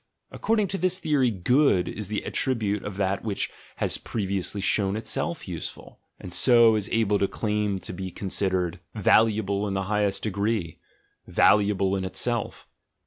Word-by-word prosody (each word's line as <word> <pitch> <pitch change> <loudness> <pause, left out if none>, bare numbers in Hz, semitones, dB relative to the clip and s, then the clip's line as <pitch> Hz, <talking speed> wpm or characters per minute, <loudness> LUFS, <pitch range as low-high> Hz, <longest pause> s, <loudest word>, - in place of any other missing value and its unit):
According 220 -2 0
to 195 - -3
this 185 +1 +2
theory, 150 -8 +1
"good" 110 -1 +2
is 105 -3 -5
the 105 +1 -3
attribute 105 -6 0
of 100 -1 -6
that 100 0 -1
which 105 -3 -2 0.2
has - - -2
previ 100 -3 -2
ously 100 +3 -3
shown 100 0 +1
itself 110 - -3
useful; - - -7 0.2
and 90 - -7
so 120 -3 +6
is 105 -2 -2
able 105 -3 +2
to 100 - +2
claim 105 -2 -1
to 95 - -7
be 95 +1 -5
considered 95 -2 -1 0.2
"valuable 105 -1 +2
in 100 - -3
the 95 - -1
highest 105 -2 +1
degree," 100 -4 -2 0.5
"valuable 100 -2 +3
in 95 - -2
itself." 115 +4 -2
105 Hz, 155 wpm, -25 LUFS, 95-115 Hz, 0.5 s, so